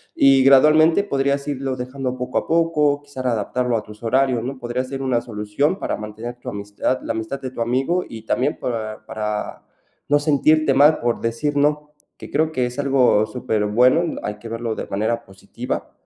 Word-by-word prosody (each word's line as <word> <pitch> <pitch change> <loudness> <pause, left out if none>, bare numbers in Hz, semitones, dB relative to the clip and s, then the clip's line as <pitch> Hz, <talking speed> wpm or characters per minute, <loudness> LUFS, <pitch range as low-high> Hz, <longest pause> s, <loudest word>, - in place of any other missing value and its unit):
y 135 -1 +5
gradualmente 155 +6 +6
podrías 140 -5 0
irlo 135 -2 -2
dejando 130 0 -4
poco 125 0 -3
a - - -10
poco. 155 -3 +2
Quizás 130 -3 -5
adaptarlo 120 +2 0
a 105 - -4
tus 105 0 -14
horarios, 130 +1 +2
¿no? 135 +1 -5
Podría 120 +1 -2
ser 135 +1 -6
una 125 -3 +1
solución 110 - -1
para - - -2
mantener 110 +3 -7
tu - - -15
amistad 105 +5 -2
la - - -3
amistad 110 +5 -4
de 130 -2 -5
tu 125 - -10
amigo, 135 +10 0
y 110 -1 -9
también 130 +6 0
para 110 -3 -4
para 105 -1 -4 0.5
no 145 0 +4
sentirte 155 0 +3
mal 145 +3 +5
por 120 -1 -1
decir 145 +6 -1
"no", 150 +1 +1 0.3
que - - -11
creo 155 +2 +1
que 130 -5 0
es 125 +3 -8
algo 130 -6 +3
superbueno. 125 +7 +1
Hay 105 0 -4
que 115 +1 -9
verlo 115 0 -3
de - - -5
manera 110 +4 -2
positiva, 95 0 -6
130 Hz, 185 wpm, -21 LUFS, 115-145 Hz, 0.5 s, gradualmente